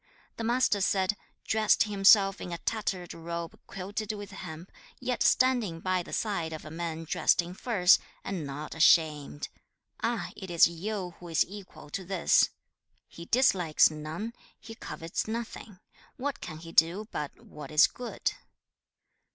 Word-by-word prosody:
The 230 - -4
Master 235 -3 +2
said, 190 0 +2 0.3
'Dressed 220 -1 +3
himself 195 -1 +5
in 180 - -6
a 170 - -3
tattered 190 -4 -3
robe 170 0 -6
quilted 200 +3 -4
with 205 -2 -8
hemp, 170 0 -9 0.3
yet 250 -1 -2
standing 240 -10 +3
by 185 +1 0
the - - -11
side 175 -7 -2
of 155 - -7
men 165 0 -4
dressed 160 - +2
in 175 +1 -1
furs, 190 -3 +4 0.2
and 190 -5 -4
not 145 +2 -6
ashamed; 155 - +3 0.5
ah! - - -1
it 190 - -8
is 170 -1 +6
Yu 180 +2 -4
who 175 - -10
is 165 -2 +2
equal 195 -6 -11
to 190 - -4
this! 185 -1 +3
2. - - -11 0.6
'"He 170 - -10
dislikes 185 - +4
none, 155 +9 -5 0.3
he 225 - -10
covets 165 -4 -5
nothing; 225 -3 -5 0.4
what 275 +1 -3
can 155 - -7
he 165 +1 -10
do 170 +7 +3
but 150 -1 -5
what 150 - -11
is 150 0 +6
good!"' 245 -1 -3
185 Hz, 150 wpm, -29 LUFS, 165-210 Hz, 0.6 s, is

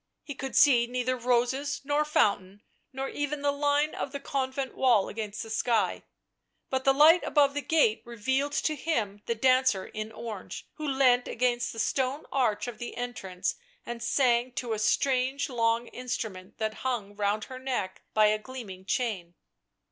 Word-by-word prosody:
He 290 - -6
could 270 0 -6
see 240 -5 +6
neither 250 +1 -1
roses, 250 +4 0
nor 290 +2 +1
fountain, 205 -9 +1 0.3
nor 270 +1 -4
even 290 0 -3
the 285 - +3
line 290 +1 +1
of 275 - -4
the 280 - -5
convent 265 -1 -3
wall 240 -7 +3
against 215 -1 -5
the 225 - -9
sky; 225 +1 +1 0.7
but 265 0 -1
the 270 - +6
light 310 +5 +7
above 285 -2 +3
the 290 - -2
gate 290 -9 +2
revealed 265 +5 -1
to 310 - +1
him 220 -10 -2
the 235 - 0
dancer 255 -4 +3
in 215 0 -6
orange, 220 -3 -7
who 305 -1 -4
leant 260 -3 +3
against 240 0 0
the - - -11
stone 265 +5 -1
arch 245 -5 +1
of 230 -3 -7
the 240 - -6
entrance 205 -7 -3 0.3
and 235 0 -6
sang 240 0 +2
to 240 -2 -3
a 215 - -2
strange 265 +5 +1
long 230 -1 +1
instrument 220 -7 -5
that 220 -1 -1
hung 225 -6 -2
round 205 +1 0
her 255 0 -8
neck 250 -8 -3
by 215 0 +6
a 215 0 +3
gleaming 215 -6 -9
chain. 195 -7 -2
245 Hz, 170 wpm, -28 LUFS, 220-270 Hz, 0.7 s, light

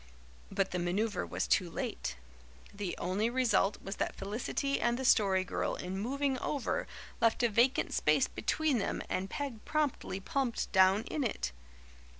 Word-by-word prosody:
But 195 - 0
the 180 - -1
manoeuvre 190 +4 0
was - - -1
too 180 - +2
late. 165 - -3 0.6
The 200 -3 -4
only 195 +6 0
result 235 -5 +2
was 195 +1 -5
that - - -1
Felicity 235 +7 -2
and 240 0 +2
the 265 - -3
Story 195 -5 +4
Girl 185 - -2
in 180 +1 -5
moving 265 +6 -1
over 280 0 -1 0.3
left 230 +1 +3
a 240 - +4
vacant 240 +5 +2
space - - +3
between 310 -6 0
them - - -2
and 190 +1 -2
Peg 275 -7 -4
promptly 295 -10 -1
plumped 250 +4 -1
down 190 +2 +5
in 295 - -2
it. 130 - -2
220 Hz, 155 wpm, -32 LUFS, 190-260 Hz, 0.6 s, down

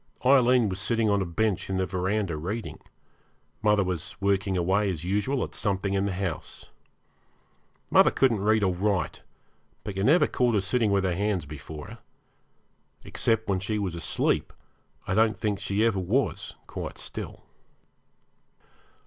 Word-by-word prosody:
Aileen 125 -3 +5
was 95 -1 -3
sitting 110 +1 +1
on 100 -1 +2
a 95 - -2
bench 95 +4 -1
in 95 - -1
the 95 - +1
verandah 95 0 -1
reading, 100 +9 -5 0.8
mother 105 -1 +3
was 90 -1 -4
working 100 -1 +1
away 95 +4 +2
as 85 -4 -4
usual 105 +9 0
at - - -6
something 100 -1 -1
in 100 0 +1
the - - -1
house. 90 -3 -5 1.2
Mother - - +7
couldn't 120 -7 +2
read 110 +1 +3
or 95 -2 +2
write, 95 0 -1 0.6
but 105 -3 -5
you 95 - -1
never 155 - +5
caught 120 -3 +1
her 100 - +3
sitting 110 +3 +1
with 100 -1 +2
her 95 -2 +1
hands 100 -2 -1
before 75 +1 -8
her. 115 +3 -11 1.0
Except 110 -1 0
when 95 -2 +1
she 105 +3 -2
was 100 -4 -2
asleep 85 -3 0 0.5
I - - -1
don't 110 +2 +3
think 105 -3 -1
she 100 +2 0
ever 110 -4 +2
was 110 +10 -1
quite - - -6
still. - - -8
100 Hz, 155 wpm, -27 LUFS, 95-110 Hz, 1.2 s, Mother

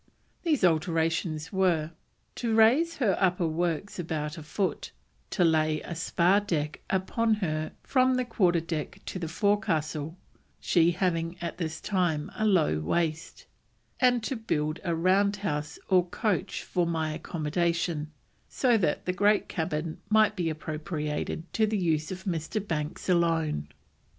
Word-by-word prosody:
These 310 - +1
alterations 165 0 +1
were: 170 -5 +2 0.4
"to 230 -2 -1
raise 265 +10 +4
her 215 -9 +2
upper 180 -2 +2
works 170 +4 -2
about 155 -3 -3
a 165 - -8
foot, 155 +3 -2 0.4
to - - +1
lay 155 -2 +3
a - - -6
spar 175 +3 +2
deck 155 -7 -2
upon 220 +4 +1
her 155 -6 -2
from 255 -1 +3
the 255 0 0
quarter 180 -7 +2
deck 160 -2 -4
to 185 - -5
the 165 - -3
forecastle 165 -5 0 0.4
(she 170 -1 +3
having 175 -1 -1
at 170 0 -5
this 160 -2 -3
time 175 -7 0
a 215 - +1
low 165 - +3
waist), 155 - -2 0.5
and 245 -2 +3
to 265 - -2
build 155 -9 -1
a 170 -3 0
round 195 +4 +3
house 150 -7 -3
or 185 -2 +4
coach 195 -1 -1
for 175 -2 0
my 160 -2 -1
accommodation, 165 0 -1 0.4
so 245 -3 +3
that 165 -6 0
the 180 - 0
great 205 +3 +3
cabin 160 -1 -3
might 215 -1 +4
be 175 -4 -1
appropriated 155 0 -3
to 220 -1 +3
the 215 0 0
use 160 -4 0
of 185 0 -6
Mr. 190 +4 -3
Banks 150 -2 -3
alone." 165 - +1
170 Hz, 145 wpm, -28 LUFS, 155-200 Hz, 0.5 s, raise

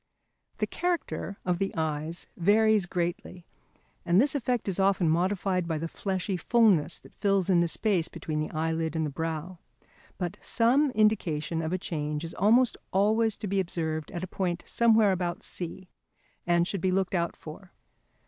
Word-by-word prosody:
The - - 0
character 345 - -3
of 180 0 0 0.2
eyes 160 +1 -2
varies 210 +1 +3
greatly, 175 0 -3 0.6
and 175 +2 +3
this 275 +4 +4
effect 250 -5 -1
is 195 -1 -1
often 190 -3 +3
modified 180 +2 +1
by 160 -2 -1
the 165 +2 -3
fleshy 190 +1 -3
fulness 195 -5 +3
that - - -15
fills 195 -2 +1
in 175 -2 +4
the 170 - +2
space 180 -1 0
between 155 -1 -4
the 155 - -2
eyelid 160 0 -2
and 160 -1 0
the 150 - -3
brow, 165 +3 -4 0.6
but 175 -2 -4
some 255 +6 +3
indication 170 -7 +1
of 160 0 -3
a 185 - 0
change 150 -4 -3
is 165 - -5
almost 230 +5 +3
always 215 +3 +2
to - - -6
be 195 0 0
observed 160 -4 -2
at 175 - -5
a - - -3
point 180 -2 -2
somewhere 225 -3 +4
about 180 -2 -2
C, 180 +1 -6 0.6
and 175 0 +3
should 195 -2 -3
be 185 - +1
looked 190 0 0
out 170 -2 0
for. 170 +4 -11
180 Hz, 165 wpm, -28 LUFS, 165-205 Hz, 0.6 s, this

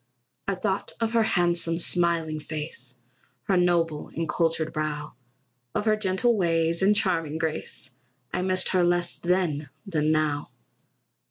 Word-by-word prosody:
I 195 - 0
thought 190 +1 -2
of 225 -1 0
her 230 -1 +3
handsome, 175 -5 +2
smiling 170 -3 +2
face, 150 -4 -6 0.5
Her 195 - +1
noble 170 -4 +1
and 165 0 -2
cultured 165 0 0
brow, 150 -1 -3 0.6
Of - - 0
her 215 -1 +4
gentle 215 +3 +1
ways, 165 -3 +1
and 200 +2 +4
charming 165 -6 +1
grace; 160 -1 -4 0.4
I - - 0
missed 185 0 +2
her 185 -2 +3
less 175 0 +1
then 170 -5 0 0.2
than 155 -5 +1
now. 155 -2 0
170 Hz, 140 wpm, -26 LUFS, 155-185 Hz, 0.6 s, her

